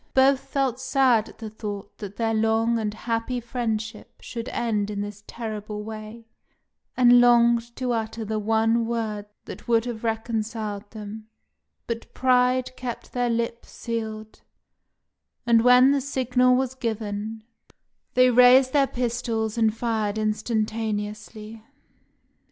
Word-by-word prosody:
Both 265 Hz, 0 st, +5 dB
felt 270 Hz, -3 st, -2 dB
sad 260 Hz, -4 st, +2 dB
at -, -, -16 dB
the 220 Hz, -1 st, -7 dB
thought 205 Hz, -2 st, -7 dB
that 200 Hz, -2 st, -7 dB
their 225 Hz, 0 st, 0 dB
long 225 Hz, +1 st, +2 dB
and 215 Hz, -1 st, -1 dB
happy 230 Hz, +3 st, -3 dB
friendship 225 Hz, -3 st, -4 dB
should 230 Hz, 0 st, -6 dB
end 210 Hz, -3 st, -1 dB
in 205 Hz, -1 st, -3 dB
this 205 Hz, 0 st, -7 dB
terrible 210 Hz, -2 st, -6 dB
way, 220 Hz, +1 st, -8 dB, 0.7 s
and 245 Hz, -1 st, +7 dB
longed 235 Hz, -1 st, +4 dB
to 255 Hz, -1 st, -2 dB
utter 225 Hz, -1 st, -3 dB
the 215 Hz, 0 st, -2 dB
one 225 Hz, +2 st, +1 dB
word 215 Hz, -3 st, -3 dB, 0.2 s
that -, -, -10 dB
would 230 Hz, -1 st, +3 dB
have 235 Hz, -2 st, -5 dB
reconciled 220 Hz, -2 st, -3 dB
them; 215 Hz, 0 st, -9 dB, 0.6 s
but 230 Hz, -1 st, -5 dB
pride 255 Hz, 0 st, +2 dB
kept 250 Hz, -2 st, -7 dB
their 245 Hz, -1 st, 0 dB
lips 235 Hz, 0 st, -2 dB
sealed, 220 Hz, -2 st, -6 dB, 1.0 s
and 230 Hz, -1 st, +5 dB
when 250 Hz, +2 st, +7 dB
the 280 Hz, -1 st, +1 dB
signal 255 Hz, -2 st, +2 dB
was 260 Hz, 0 st, 0 dB
given, 220 Hz, -2 st, -4 dB, 0.7 s
they 255 Hz, 0 st, +6 dB
raised 250 Hz, +2 st, +6 dB
their 280 Hz, -2 st, +4 dB
pistols 235 Hz, -3 st, -2 dB
and 225 Hz, -1 st, +1 dB
fired 220 Hz, -3 st, -1 dB
instantaneously. 215 Hz, 0 st, -3 dB
225 Hz, 130 wpm, -25 LUFS, 215-245 Hz, 1.0 s, and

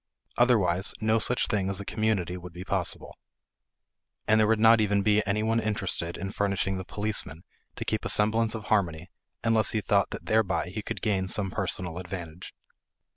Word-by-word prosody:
Otherwise, 100 Hz, -7 st, +2 dB
no 110 Hz, +1 st, +2 dB
such 125 Hz, +3 st, +2 dB
thing 100 Hz, -4 st, -1 dB
as 95 Hz, -, -2 dB
a 100 Hz, -, -6 dB
community 100 Hz, -6 st, -1 dB
would 90 Hz, -1 st, -9 dB
be 90 Hz, +2 st, -7 dB
possible. 95 Hz, -4 st, -2 dB, 1.1 s
And 110 Hz, 0 st, +4 dB
there 110 Hz, -, +4 dB
would 110 Hz, 0 st, +2 dB
not 115 Hz, 0 st, +6 dB
even 100 Hz, -1 st, +1 dB
be 105 Hz, 0 st, +3 dB
any 105 Hz, +2 st, 0 dB
one 115 Hz, +1 st, +1 dB
interested 95 Hz, -6 st, -2 dB
in 95 Hz, +2 st, -5 dB
furnishing 100 Hz, -2 st, -1 dB
the -, -, -5 dB
policeman 100 Hz, -5 st, -2 dB, 0.3 s
to -, -, -5 dB
keep -, -, -1 dB
a -, -, -3 dB
semblance 110 Hz, +2 st, +3 dB
of 110 Hz, -, -6 dB
harmony 90 Hz, -8 st, -1 dB, 0.3 s
unless 115 Hz, -2 st, +2 dB
he 110 Hz, -, +1 dB
thought 90 Hz, -, +2 dB
that -, -, -8 dB
thereby 95 Hz, -6 st, +1 dB
he 105 Hz, +4 st, -5 dB
could -, -, -6 dB
gain 95 Hz, -3 st, 0 dB
some 95 Hz, 0 st, 0 dB
personal 90 Hz, -1 st, -2 dB
advantage. 90 Hz, -2 st, -8 dB
100 Hz, 180 wpm, -27 LUFS, 90-110 Hz, 1.1 s, not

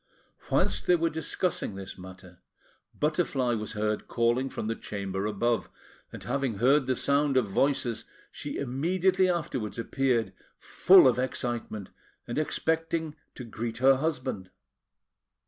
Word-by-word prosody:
Whilst -, -, +1 dB
they 180 Hz, -, +6 dB
were 165 Hz, -1 st, 0 dB
discussing 160 Hz, -, -2 dB
this 95 Hz, -1 st, -7 dB
matter, 90 Hz, -1 st, -12 dB, 0.6 s
Butterfly 150 Hz, -5 st, +1 dB
was 110 Hz, -1 st, -4 dB
heard 105 Hz, 0 st, -2 dB
calling 120 Hz, +3 st, +1 dB
from -, -, -5 dB
the 110 Hz, -, -1 dB
chamber 100 Hz, -2 st, -4 dB
above; 115 Hz, +3 st, 0 dB, 0.4 s
and -, -, -9 dB
having 135 Hz, -2 st, -1 dB
heard 135 Hz, +5 st, +3 dB
the 130 Hz, -, +1 dB
sound 140 Hz, 0 st, +2 dB
of 125 Hz, -, +3 dB
voices, 120 Hz, +3 st, 0 dB, 0.3 s
she -, -, -6 dB
immediately 180 Hz, +8 st, +1 dB
afterwards 135 Hz, -12 st, -2 dB
appeared, 120 Hz, 0 st, 0 dB, 0.2 s
full 185 Hz, -6 st, +6 dB
of 125 Hz, -1 st, +2 dB
excitement, 120 Hz, -5 st, -3 dB, 0.4 s
and 120 Hz, -, -2 dB
expecting 160 Hz, 0 st, -1 dB, 0.2 s
to 125 Hz, -, -7 dB
greet 115 Hz, 0 st, -5 dB
her 135 Hz, +1 st, +5 dB
husband. 130 Hz, -, -3 dB
130 Hz, 130 wpm, -28 LUFS, 110-150 Hz, 0.6 s, they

